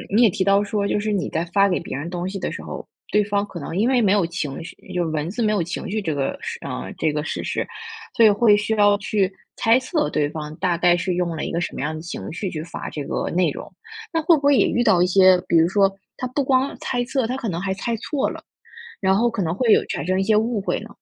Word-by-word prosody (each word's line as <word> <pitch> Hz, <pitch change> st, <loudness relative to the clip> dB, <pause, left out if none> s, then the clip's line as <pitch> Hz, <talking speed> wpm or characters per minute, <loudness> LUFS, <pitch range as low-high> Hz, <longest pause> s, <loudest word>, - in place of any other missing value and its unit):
你 235 Hz, -, +5 dB
也 225 Hz, -, +7 dB
提 185 Hz, -, -1 dB
到 200 Hz, +1 st, +3 dB
说， 200 Hz, -1 st, -1 dB
就 205 Hz, -, 0 dB
是 215 Hz, 0 st, -2 dB
你 195 Hz, -3 st, 0 dB
在 165 Hz, -, -1 dB
发 200 Hz, +3 st, +3 dB
给 180 Hz, -, 0 dB
别 170 Hz, -, -6 dB
人 160 Hz, +4 st, -5 dB
东 180 Hz, +1 st, -3 dB
西 195 Hz, 0 st, -5 dB
的 -, -, -3 dB
时 -, -, -6 dB
候， -, -, -8 dB, 0.2 s
对 210 Hz, 0 st, +4 dB
方 200 Hz, 0 st, 0 dB
可 170 Hz, -, -8 dB
能 165 Hz, +3 st, -6 dB
因 225 Hz, +6 st, +2 dB
为 260 Hz, -, +3 dB
没 200 Hz, -, +3 dB
有 200 Hz, -5 st, +3 dB
情 160 Hz, -3 st, -4 dB
绪， -, -, -10 dB, 0.2 s
就 175 Hz, -1 st, 0 dB
是 160 Hz, -, -2 dB
文 155 Hz, +1 st, -2 dB
字 215 Hz, +5 st, -4 dB
没 215 Hz, -1 st, +2 dB
有 205 Hz, -, +1 dB
情 175 Hz, +2 st, -5 dB
绪 215 Hz, +1 st, -1 dB
这 160 Hz, -5 st, -2 dB
个 135 Hz, -1 st, -2 dB
事 -, -, -5 dB
嗯， -, -, -5 dB
这 160 Hz, -, +1 dB
个 150 Hz, 0 st, -2 dB
事 -, -, -4 dB
实， -, -, -2 dB, 0.5 s
所 230 Hz, -, +5 dB
以 -, -, +8 dB
会 205 Hz, +1 st, +5 dB
需 215 Hz, +2 st, 0 dB
要 205 Hz, -1 st, +5 dB
去 200 Hz, -2 st, 0 dB, 0.3 s
猜 230 Hz, +3 st, +4 dB
测 300 Hz, +3 st, -1 dB
对 145 Hz, -1 st, +1 dB
方， 150 Hz, -1 st, -6 dB
大 175 Hz, -2 st, 0 dB
概 175 Hz, 0 st, +4 dB
是 175 Hz, +1 st, -1 dB
用 175 Hz, -2 st, -1 dB
了 -, -, -4 dB
一 -, -, -4 dB
个 170 Hz, -, -1 dB
什 175 Hz, -, -3 dB
么 -, -, -5 dB
样 150 Hz, +2 st, -2 dB
的 155 Hz, -, -6 dB
情 170 Hz, -, -6 dB
绪 190 Hz, +3 st, -4 dB
去 155 Hz, -, -4 dB
发 170 Hz, -, -7 dB
这 145 Hz, -, -5 dB
个 -, -, -2 dB
内 180 Hz, +1 st, +2 dB
容。 -, -, -7 dB, 0.4 s
那 325 Hz, -, +1 dB
会 325 Hz, +1 st, +5 dB
不 -, -, -6 dB
会 285 Hz, 0 st, +5 dB
也 210 Hz, -, +4 dB
遇 240 Hz, -, +1 dB
到 190 Hz, -6 st, +4 dB
一 180 Hz, -, +4 dB
些， 185 Hz, -1 st, +6 dB
比 170 Hz, -, +3 dB
如 165 Hz, +1 st, +5 dB
说 195 Hz, +1 st, +3 dB, 0.2 s
他 255 Hz, -, -4 dB
不 275 Hz, +3 st, -1 dB
光 265 Hz, +1 st, +1 dB
猜 245 Hz, -1 st, -1 dB
测， 260 Hz, -1 st, 0 dB
他 250 Hz, +3 st, -2 dB
可 240 Hz, -5 st, -3 dB
能 170 Hz, -2 st, -3 dB
还 190 Hz, 0 st, -1 dB
猜 230 Hz, +4 st, -3 dB
错 275 Hz, +5 st, -1 dB
了， -, -, -8 dB, 0.6 s
然 190 Hz, 0 st, +3 dB
后 235 Hz, +2 st, +2 dB
可 225 Hz, -3 st, -2 dB
能 165 Hz, +2 st, -1 dB
会 225 Hz, +1 st, +3 dB
有 -, -, +6 dB
产 140 Hz, -, -3 dB
生 185 Hz, +1 st, 0 dB
一 -, -, +1 dB
些 215 Hz, +2 st, +3 dB
误 220 Hz, 0 st, +1 dB
会 -, -, -2 dB
呢？ -, -, -10 dB
195 Hz, 315 characters per minute, -22 LUFS, 170-220 Hz, 0.6 s, 以